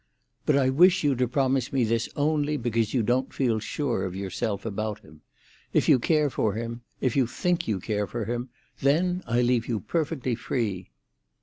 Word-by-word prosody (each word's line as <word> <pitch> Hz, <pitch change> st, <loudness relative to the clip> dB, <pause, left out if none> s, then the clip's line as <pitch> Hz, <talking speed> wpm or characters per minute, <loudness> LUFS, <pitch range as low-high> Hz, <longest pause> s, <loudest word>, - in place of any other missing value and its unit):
"But 150 Hz, -, +4 dB
I 130 Hz, -1 st, +3 dB
wish 180 Hz, +6 st, +5 dB
you 145 Hz, -2 st, +3 dB
to 125 Hz, 0 st, +1 dB
promise 130 Hz, 0 st, +1 dB
me 135 Hz, -2 st, +2 dB
this 115 Hz, 0 st, 0 dB
only 150 Hz, 0 st, +1 dB
because 115 Hz, -3 st, 0 dB
you 125 Hz, -4 st, +1 dB
don't 125 Hz, +4 st, +1 dB
feel 120 Hz, -5 st, +1 dB
sure 120 Hz, -3 st, -2 dB
of 95 Hz, -1 st, -4 dB
yourself 100 Hz, +2 st, -3 dB
about 110 Hz, 0 st, -3 dB
him. 80 Hz, -7 st, -17 dB, 0.5 s
If -, -, +3 dB
you 130 Hz, -, +6 dB
care 150 Hz, +1 st, +2 dB
for 105 Hz, -5 st, 0 dB
him—if 115 Hz, +2 st, -4 dB
you 130 Hz, -4 st, +3 dB
think 175 Hz, +8 st, -1 dB
you 105 Hz, -4 st, 0 dB
care 105 Hz, +1 st, -2 dB
for 120 Hz, -3 st, -4 dB
him—then 140 Hz, -, -1 dB
I 120 Hz, +1 st, +2 dB
leave 120 Hz, -1 st, +1 dB
you 115 Hz, -3 st, -1 dB
perfectly 140 Hz, 0 st, -2 dB
free." 105 Hz, -, -2 dB
120 Hz, 180 wpm, -26 LUFS, 110-140 Hz, 0.5 s, you